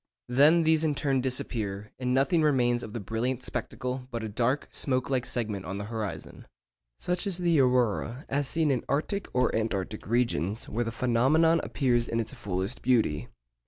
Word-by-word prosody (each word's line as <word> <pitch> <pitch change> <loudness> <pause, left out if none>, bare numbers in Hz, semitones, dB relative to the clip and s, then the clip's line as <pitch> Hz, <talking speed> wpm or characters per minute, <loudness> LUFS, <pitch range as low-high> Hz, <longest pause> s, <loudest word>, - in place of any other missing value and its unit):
Then 150 +7 +5
these 160 0 +3
in 150 -2 +1
turn 135 -2 +1
disappear, 105 -5 -2
and 125 -1 -1
nothing 140 +6 +3
remains 125 -5 +2
of 110 - -7
the 120 - -3
brilliant 115 +5 -2
spectacle 125 0 -4
but 115 -3 -4
a 110 - -3
dark 120 +6 0
smoke 130 -1 -1
like 130 -2 0
segment 105 -5 -2
on 95 +4 -5
the 100 - -4
horizon. 110 -2 -6 0.5
Such 180 +3 -2
is 190 -3 0
the 170 -4 +2
aurora 125 0 +1
as 140 0 -1
seen 160 0 +1
in 125 -3 0
arctic 155 +8 -1
or 125 - +1
antarctic 105 -2 -2
regions, 115 -3 0
where 120 +3 -1
the 115 - -2
phenomenon 130 +8 +3
appears 120 -4 +1
in 115 - -1
its 115 - -3
fullest 100 -2 -3
beauty. 110 - +1
125 Hz, 175 wpm, -28 LUFS, 110-140 Hz, 0.5 s, Then